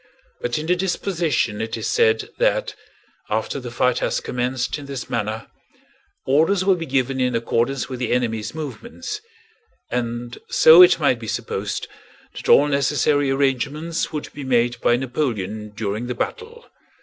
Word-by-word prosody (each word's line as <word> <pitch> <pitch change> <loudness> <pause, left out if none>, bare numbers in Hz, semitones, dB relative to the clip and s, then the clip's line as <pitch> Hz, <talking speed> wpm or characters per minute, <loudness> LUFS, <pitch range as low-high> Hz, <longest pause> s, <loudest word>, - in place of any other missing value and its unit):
But 120 0 -1
in 155 - -3
the 180 +2 +2
disposition 170 - -1
it 110 0 -3
is - - -5
said 455 -1 +2
that, - - +1 0.6
after - - -1
the - - -7
fight - - +1
has - - 0
commenced 125 +3 -2
in 140 - -10
this 135 -3 -6
manner, 110 -1 -2 0.8
orders 165 +8 +3
will 195 - +5
be 165 -2 -4
given 130 0 0
in 125 -1 +1
accordance 115 +3 0
with 130 -2 -6
the 125 - -2
enemy's 115 -2 -1
movements, 235 - -6 0.7
and 120 0 -3
so 160 +3 +8
it 180 - +7
might 140 -6 +2
be 115 - -8
supposed 100 -1 -3 0.5
that - - -7
all 145 - +7
necessary 145 0 +2
arrangements 140 +4 -1
would 150 -2 -5
be 145 - -7
made 120 -2 +1
by 120 - +4
Napoleon 110 -5 -3
during 105 +2 -3
the 125 - -3
battle. 465 - -5
135 Hz, 155 wpm, -22 LUFS, 120-160 Hz, 0.8 s, so